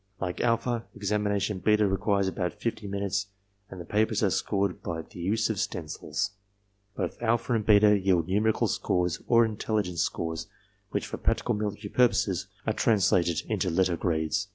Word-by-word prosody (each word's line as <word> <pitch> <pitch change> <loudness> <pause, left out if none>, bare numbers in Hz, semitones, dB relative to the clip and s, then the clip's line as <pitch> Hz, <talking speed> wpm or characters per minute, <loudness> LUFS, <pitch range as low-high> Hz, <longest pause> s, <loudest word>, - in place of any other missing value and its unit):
Like 90 -2 -3
alpha, 115 0 0
examination 105 -1 -1
beta 105 +3 +3
requires 100 0 +1
about 90 -2 -2
fifty 110 -3 -3
minutes 100 0 -2 0.4
and 95 - -9
the 85 - -7
papers 110 +3 +1
are 100 - +3
scored 100 0 -1
by 85 -4 -4
the 90 - -13
use 105 +6 +1
of 105 - -3
stencils. 90 +1 -3 0.7
Both - - -3
alpha 120 +1 +1
and 110 -2 +1
beta 105 -1 +5
yield 90 -4 +2
numerical 105 +3 +2
scores 90 -2 0
or 115 -1 +5
intelligence 105 -5 -1
scores 80 -1 -2 0.4
which - - -2
for - - -5
practical - - 0
military 105 0 -3
purposes 100 -7 +2 0.2
are 110 - +1
translated 95 -7 +2
into - - 0
letter 90 +1 +2
grades. 85 +5 -1
100 Hz, 155 wpm, -28 LUFS, 90-105 Hz, 0.7 s, beta